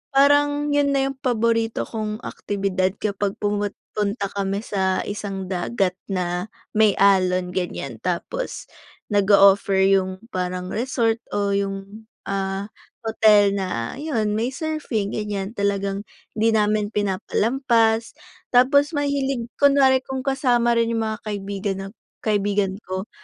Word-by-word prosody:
parang 290 +1 +4
yun 290 -1 +3
na 270 0 +1
yung 270 - -12
paborito 230 -3 +1
kong 215 0 -5
aktibidad 195 -2 -1
kapag 200 -1 -1
pumut 205 -1 -1 0.2
punta 200 -1 -2
kami 200 +1 -2
sa 190 -3 0
isang 195 -2 -5
dagat 185 +1 0
na 180 -1 -2 0.2
may 215 -2 +4
alon 185 -2 +3
ganyan. 175 -10 -4
Tapos 185 - -3 0.5
nag-o-offer 200 -1 +5
yung 190 +1 +1
parang 180 0 -3
resort 230 -1 0 0.2
o 200 -1 +1
yung, 200 +2 -3 0.2
ah, 195 +1 -2 0.3
hotel 215 -2 +4
na 185 - -3
yun 225 -8 -1
may 240 +4 -1
surfing 295 - -2
ganyan, 205 -2 -3
talagang 200 0 -1 0.3
'di 225 +1 +3
namin 210 0 +1
pinapalampas. 225 +3 +1 0.4
Tapos 280 +5 +4
mahilig 275 -4 -1
kunwari 275 -2 +4
kung 265 0 -4
kasama 245 -3 +2
rin 230 0 +1
yung 225 - 0
mga 215 - -3
kaibigan 200 -1 -3
na 195 - -6 0.3
kaibigan 205 -2 0
ko 185 +2 -4
210 Hz, 125 wpm, -23 LUFS, 195-235 Hz, 0.5 s, nag-o-offer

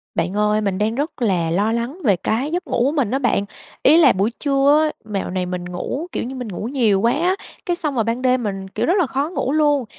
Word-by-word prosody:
Bạn 180 +3 -1
ơi, 210 0 +2
mình 195 -3 -1
đang 215 +2 0
rất 290 +1 -3
là 175 -7 +1
lo 205 +5 +1
lắng 235 +8 -2
về 205 -7 +4
cái 240 - -2
giấc 355 +2 -3
ngủ 240 - +1
của 275 - +2
mình 275 -8 0
á 270 - +1
bạn, 245 -6 +1 0.4
ý 305 +4 +6
là 300 -7 +7
buổi 200 +5 0
trưa 280 +1 +3
á, 310 - +1 0.2
mẹo 195 -2 -2
này 185 0 -2
mình 180 0 -4
ngủ, 180 - -4
kiểu - - -2
như, 255 +3 -6
mình 250 -2 -5
ngủ 195 -2 -6
nhiều 230 -7 +2
quá 235 - +3
á, 355 +5 +1 0.3
cái 350 - 0
xong 300 -5 -2
rồi 230 - +2
ban 230 +3 -2
đêm 255 -1 +2
mình, 195 -2 -4
kiểu, 190 - -2
rất 345 - +2
là 345 - +2
khó 275 +4 -1
ngủ 300 -6 -2
luôn. 290 -3 +2
240 Hz, 265 wpm, -20 LUFS, 200-285 Hz, 0.4 s, là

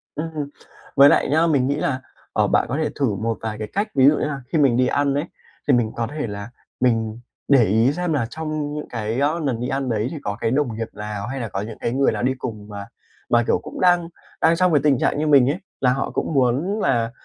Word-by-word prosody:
Ừm, 155 -2 -4 0.5
với 140 +1 +8
lại - - +3
nhá, 160 +3 +3
mình 140 -5 +2
nghĩ 140 - +1
là, 140 -3 -1 0.3
ờ, - - +2
bạn - - +2
có 140 - -1
thể 155 -1 0
thử 120 -8 +1
một 110 +3 -2
vài 110 -1 -4
cái 105 - -4
cách. 205 +3 0
Ví 135 -1 +6
dụ 150 - +5
như - - -1
là 140 -2 -4
khi 165 - +1
mình 135 -6 +4
đi 125 0 +3
ăn 140 0 +1
ấy, 145 +3 -1 0.4
thì 145 - +5
mình 120 -3 +2
có 115 -1 -1
thể 150 0 -4
là 100 +1 -6 0.3
mình 115 -2 +1 0.3
để 135 -4 +6
ý 110 +5 +3
xem 175 -1 -1
là 135 -6 +1
trong 155 0 -4
những 150 0 -5
cái, 115 +1 -3
ơ, 150 +4 +1
nần 130 -5 -1
đi 125 - -2
ăn 135 0 -2
đấy, 110 -1 0
thì 160 - -5
có 105 +1 -3
cái 115 - 0
đồng 130 -4 0
nghiệp 115 0 -3
lào 105 0 -5
hay 135 +3 -4
là 115 -4 -4
có 95 - -3
những 110 +1 -7
cái 115 - -1
người 135 +1 +3
lào - - -3
đi 130 +1 +2
cùng 105 -5 -6
mà 100 -1 -7 0.5
mà, 120 0 +4
kiểu, - - +2
cũng - - -8
đang 175 -2 +3 0.3
đang 165 +1 +4
trong 180 0 +2
cái 145 - +4
tình 145 -3 +4
trạng - - +1
như 155 - 0
mình 140 -3 +6
ấy, 160 - -1 0.2
là 125 -1 +4
họ 135 - -2
cũng - - -2
muốn 140 - +1
là 120 - +1
135 Hz, 265 wpm, -22 LUFS, 115-150 Hz, 0.5 s, với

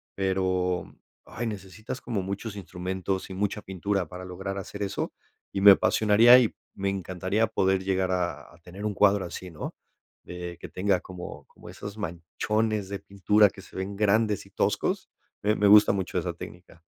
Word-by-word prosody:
Pero, 95 -2 0 0.3
ay 120 - -5
necesitas 105 +4 -6
como 110 -6 -2
muchos 100 +3 -5
instrumentos 95 +1 -4
y 95 - -6
mucha 105 +2 -1
pintura 95 -1 -2
para 90 +2 -8
lograr 95 +2 -5
hacer 100 +1 -7
eso, 100 -1 -2 0.4
y 95 - -1
me 100 0 +11
apasionaría, 110 +5 +6
y 120 -4 +1 0.2
me 100 0 -2
encantaría 95 +2 -1
poder 95 -3 +1
llegar 95 -1 0
a 90 -1 -2
a - - -18
tener 95 +4 -8
un 105 -1 -1
cuadro 100 0 +4
así, 90 +1 -7
¿no? 75 - -6 0.5
De 90 -1 -7
que - - -8
tenga 95 0 +1
como 90 -1 -9
como - - -14
esos 105 0 -8
manchones 105 +4 -2
de 100 - -3
pintura 100 +2 +3
que 95 - -12
se - - -17
ven 95 +2 -4
grandes 105 0 +2
y - - -19
toscos. - - -1 0.3
Me 105 +1 +3
me 105 - +3
gusta 105 +1 +8
mucho 95 -2 -2
esa - - -1
técnica. 90 -1 -11
95 Hz, 175 wpm, -27 LUFS, 90-105 Hz, 0.5 s, me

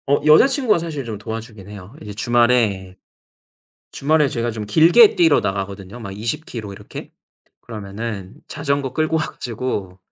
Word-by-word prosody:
어 140 +1 +3
여자친구가 230 - +5
사실 155 -5 -5
좀 110 -2 -5
도와주긴 110 -2 -8
해요. 100 +1 -11
이제 105 -1 -8
주말에, 110 -5 +1 1.0
주말에 150 +1 +2
제가 120 -2 -2
좀 110 -2 -6
길게 170 - +6
뛰러 165 -4 +4
나가거든요 100 +2 -5
막 100 -4 -7
20 115 +9 -3
키로 105 -4 -7
이렇게. 100 +1 -10 0.5
그러면은 105 -2 -7
자전거 140 -3 -2
끌고 155 0 0
와 155 - +1
가지고 110 -8 -5
115 Hz, 320 characters per minute, -20 LUFS, 100-145 Hz, 1.0 s, 길게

